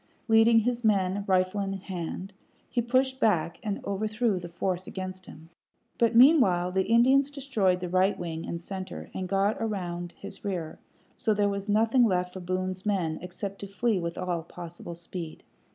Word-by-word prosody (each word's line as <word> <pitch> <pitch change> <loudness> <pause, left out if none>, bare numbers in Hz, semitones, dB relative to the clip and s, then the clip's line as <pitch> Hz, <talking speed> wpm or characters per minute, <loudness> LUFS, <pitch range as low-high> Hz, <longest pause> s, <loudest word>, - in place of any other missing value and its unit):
Leading 225 0 +6
his 245 +1 -1
men, 200 -2 +2
rifle 185 +1 +2
in 195 0 -2
hand, 190 0 -5 0.3
he 240 - 0
pushed 260 +2 +1
back 175 - +1
and 210 -3 -4
overthrew 215 +1 0
the 175 -1 -8
force 180 +1 -2
against 185 -1 -6
him; 160 +2 -13 0.5
but 230 -1 +3
meanwhile 230 - +6
the 190 0 +1
Indians 260 +5 +5
destroyed 230 -11 0
the 180 - -2
right 185 +3 +2
wing 165 -2 -4
and 170 - -3
center, 190 +2 -7
and 185 -1 -4
got 200 +3 +1
round 175 -3 -4
in - - -33
his - - -8
rear, 175 -6 -4 0.4
so 220 -4 +1
that 205 - 0
there 205 - +3
was 200 +1 -4
nothing 225 +4 +4
left 180 -4 +1
for 190 - -6
Boone's 185 +1 -3
men 180 -7 0
except 190 +3 -6
to 200 - -6
flee 210 +1 0
with 170 -1 -4
all 180 -2 -2
possible 170 0 -9
speed. 170 -1 -7
190 Hz, 180 wpm, -28 LUFS, 180-220 Hz, 0.5 s, Leading